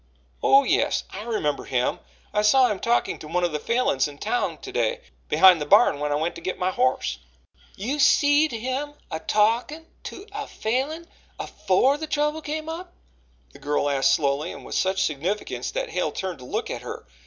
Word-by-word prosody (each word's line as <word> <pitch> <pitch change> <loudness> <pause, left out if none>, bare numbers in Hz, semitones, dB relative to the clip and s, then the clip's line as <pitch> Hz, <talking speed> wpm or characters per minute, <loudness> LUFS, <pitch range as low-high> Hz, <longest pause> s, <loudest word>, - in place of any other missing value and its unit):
"Oh, 275 +1 +6
yes, - - +1
I 195 - -6
remember 210 -11 -2
him. 125 -1 0 0.3
I 210 - +2
saw 250 +5 +5
him 200 - -3
talking 235 +1 0
to 155 - -9
one 175 +3 -1
of 175 - +1
the 150 - -2
Falins 230 - +1
in 145 -1 -11
town 370 - -1
to - - -9
day, - - -1 0.3
behind 185 -4 +6
the - - -1
barn, 145 - +5
when 150 0 -2
I - - +2
went 160 +3 -1
to - - -10
get 185 - -3
my 185 0 0
horse." 255 +5 0 0.6
"You 255 +10 -3
seed 290 +2 +4
him 260 +5 -3 0.2
a 160 - -3
talkin' 235 - +1 0.2
to 385 - -8
a 420 +1 -5
Falin 275 +9 -2 0.3
AFORE 250 +9 +1
the 315 +1 -5
trouble 300 +1 0
come 310 +1 -4
up?" 345 +3 -7 0.6
the - - -14
girl 145 0 0
asked 135 -1 +3
slowly 145 +2 -1
and - - -10
with - - -7
such 190 0 +1
significance 165 +8 -2
that - - -3
Hale - - -1
turned 185 -6 -5
to 125 - -11
look - - -3
at - - -5
her. - - -8
220 Hz, 195 wpm, -24 LUFS, -, 0.6 s, Oh